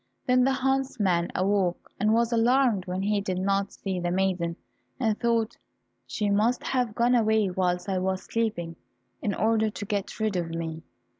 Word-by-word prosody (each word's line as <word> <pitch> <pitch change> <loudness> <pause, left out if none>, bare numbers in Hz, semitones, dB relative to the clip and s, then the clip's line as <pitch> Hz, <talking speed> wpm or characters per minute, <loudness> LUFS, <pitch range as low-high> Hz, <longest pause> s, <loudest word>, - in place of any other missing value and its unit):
Then 250 0 +4
the 270 - +3
huntsman 255 -10 0
awoke, 190 -2 0
and 210 +2 +2
was 235 +1 +2
alarmed 235 -4 +3
when 185 +1 -2
he 205 0 +1
did 185 -2 -2
not 195 +1 0
see 190 -2 -4
the 175 0 -1
maiden, 180 -2 0 0.4
and 220 -2 +1
thought, 230 -2 0 0.5
"She 210 -1 -1
must 220 +5 +2
have 245 -5 -1
gone 240 +1 +3
away 220 -4 +3
whilst 180 0 0
I 190 -2 0
was 190 0 -1
sleeping, 175 -8 -2 0.4
in 205 - -1
order 220 0 +2
to 205 0 -6
get 205 +1 -3
rid 215 -2 0
of 170 -2 -2
me." 165 -1 -4
205 Hz, 170 wpm, -27 LUFS, 185-230 Hz, 0.5 s, Then